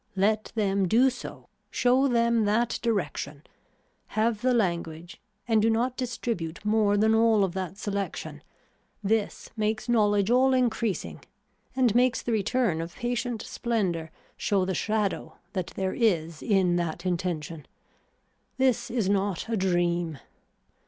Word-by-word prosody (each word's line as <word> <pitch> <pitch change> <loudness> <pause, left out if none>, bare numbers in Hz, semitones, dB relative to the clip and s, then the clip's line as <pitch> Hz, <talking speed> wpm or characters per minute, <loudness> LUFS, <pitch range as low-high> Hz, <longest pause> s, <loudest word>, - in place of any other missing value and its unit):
Let 215 +3 +1
them 200 -3 +1
do 250 +7 +4
so, 245 - -9 0.2
show 255 +2 +3
them 235 -2 +2
that 225 +3 +1
direction, 165 - -2 0.7
have 220 0 +1
the 255 +1 +2
language 170 -6 -2 0.3
and 220 -2 +3
do 225 - +3
not 240 +3 +1
distribute 230 -9 -4
more 210 -1 +3
than 220 +2 +4
all 225 -2 +4
of 185 -3 -1
that 190 0 -4
selection, 200 -2 -4 0.6
this 215 +1 -1
makes 215 +1 -1
knowledge 205 -3 +3
all 260 +1 +4
increasing 235 -5 -1 0.5
and 250 -5 +3
makes 245 +1 +2
the 240 - -2
return 215 -4 +1
of 165 +1 -7
patient 240 -1 -2
splendor 185 -9 -2 0.3
show 195 -2 +1
the 190 - -1
shadow 210 0 -1 0.2
that 185 -3 -2
there 190 -1 -1
is 170 -9 0
in 185 -4 +2
that 170 +1 -3
intention. 165 -3 -3 0.9
This 260 -3 +2
is 230 -5 0
not 200 -1 0
a 230 - 0
dream. 175 -4 0
210 Hz, 135 wpm, -27 LUFS, 185-235 Hz, 0.9 s, do